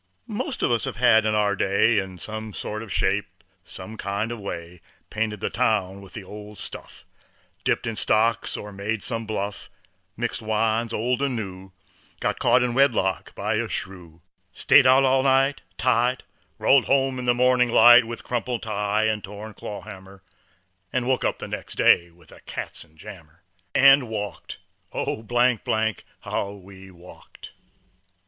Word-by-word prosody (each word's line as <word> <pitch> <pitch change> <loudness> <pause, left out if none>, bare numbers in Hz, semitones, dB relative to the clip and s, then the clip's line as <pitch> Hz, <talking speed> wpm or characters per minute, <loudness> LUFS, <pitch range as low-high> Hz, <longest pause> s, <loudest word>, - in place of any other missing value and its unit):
'Most 245 +4 -4
all - - +5
of - - 0
us 115 -2 +2
have 115 -3 +3
in 105 - +1
our 105 -1 +2
day 100 +3 +2
In 95 -1 -6
some 110 +2 -6
sort 105 0 -4
of 110 -3 -9
shape, - - -1 0.2
some 110 0 -9
kind 100 +3 -3
of 120 - -5
way 85 -3 -7 0.3
Painted 105 -2 -2
the - - -2
town 105 -5 0
with 95 -2 -8
the 110 - -6
old 105 +2 -10
stuff, - - -9 0.6
Dipped - - 0
in 115 - -3
stocks 110 +1 +1
or 105 - -8
made 100 +2 -3
some 115 -2 -3
bluff, 105 -1 -4 0.5
Mixed 120 0 -2
wines, 110 +1 0
old 120 +3 -1
and 140 -3 0
new, 95 -3 -7 0.5
Got - - -1
caught 125 - +4
in 125 -1 -1
wedlock 120 -8 +1
by - - -1
a - - -2
shrew, 85 -4 -5 0.3
Stayed - - +5
out 130 +1 +6
all 130 0 +3
night, 135 +1 +2 0.2
tight, 125 +1 +1 0.3
Rolled 135 -2 +4
home 135 -1 +1
in 125 - -5
the 120 0 +3
morning 125 0 +3
light, 120 +1 +8
With 115 +1 -5
crumpled 120 0 -3
tie 105 0 -1
and 110 -1 0
torn 105 +2 -9
clawhammer, 100 -2 -10 0.7
'N' 125 -1 -1
woke 130 0 +1
up - - -1
next - - -6
day 85 0 +4
with 85 -1 -17
a - - -14
katzenjammer, 80 0 -9 0.3
And 135 -2 +6
walked, 105 -3 -5 0.3
oh, 110 - -3 1.0
how 100 - -3
we 95 -1 -13
walked. 90 -1 -14
110 Hz, 155 wpm, -24 LUFS, 100-120 Hz, 1.0 s, light